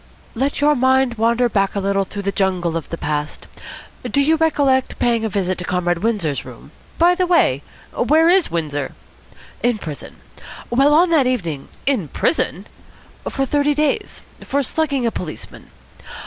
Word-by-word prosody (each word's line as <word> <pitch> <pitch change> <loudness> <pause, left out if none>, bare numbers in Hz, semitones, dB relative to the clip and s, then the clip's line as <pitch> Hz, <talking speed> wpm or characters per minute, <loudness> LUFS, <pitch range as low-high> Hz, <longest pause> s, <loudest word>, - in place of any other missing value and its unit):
"Let 275 +4 -1
your 300 +1 +5
mind 260 -1 +3
wander 235 +2 +3
back 195 -4 0
a - - 0
little 195 0 0
through 200 +1 -7
the 200 - -1
jungle 185 -4 0
of 165 - -4
the 165 - -5
past. 150 -1 -3 0.6
Do 280 - -1
you 300 +3 +4
recollect 285 -5 +1
paying 235 -2 +1
a 220 - -1
visit 185 -2 -1
to - - -4
Comrade 175 -1 -1
Windsor's 195 -10 -1
room - - -13
" - - -28
"By 345 +2 +5
the 360 0 0
way, 350 -1 +3 0.3
where 320 +2 +3
is 360 +1 +4
Windsor?" 145 -4 -3 0.7
"In 240 -2 +1
prison. 155 -8 -8 0.6
Well, 275 +4 +4
on 340 +2 +4
that 290 -6 +4
evening 170 - -2
" - - -28
"In 190 -10 -5
prison?" 320 - -1 0.6
"For 270 - -1
thirty 290 +1 +1
days. 300 -1 -1 0.2
For 280 +1 0
slugging 280 -3 -1
a 230 - +1
policeman. 160 -7 -8
235 Hz, 170 wpm, -19 LUFS, 180-285 Hz, 0.7 s, your